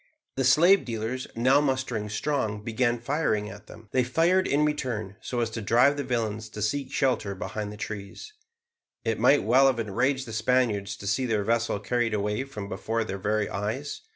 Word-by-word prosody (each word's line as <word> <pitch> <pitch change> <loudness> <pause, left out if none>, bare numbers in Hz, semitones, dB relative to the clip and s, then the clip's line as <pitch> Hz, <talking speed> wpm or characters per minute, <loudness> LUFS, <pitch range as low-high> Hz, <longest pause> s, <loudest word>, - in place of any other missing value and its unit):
The 135 - 0
slave 170 +10 +5
dealers, 115 +2 -4
now 130 +5 +4
mustering 130 -6 -1
strong, 110 -3 -2
began 120 +1 0
firing 120 -5 -1
at 105 +2 -12
them. 110 - -13
They 130 - +2
fired 170 +9 +2
in 145 +2 +2
return, 120 -9 -2
so 120 -1 -2
as 115 -1 -1
to 115 - -4
drive 120 +7 +4
the 145 - -3
villains 110 -4 -2
to 105 - -8
seek 135 +6 -1
shelter 125 -7 0
behind 105 +2 -5
the 105 - -9
trees. 105 - -7 0.7
It 115 -1 0
might 130 +5 +5
well 130 +5 +5
have 130 -3 +2
enraged 130 +5 0
the 115 - -7
Spaniards 110 -3 +1
to - - -10
see 115 +6 0
their 110 -3 0
vessel 115 -1 0
carried 120 +1 0
away 105 +5 -1
from 105 -7 -7
before 115 +2 -2
their 100 -2 -5
very 105 +1 0
eyes. 110 +9 -4
115 Hz, 185 wpm, -27 LUFS, 105-130 Hz, 0.7 s, slave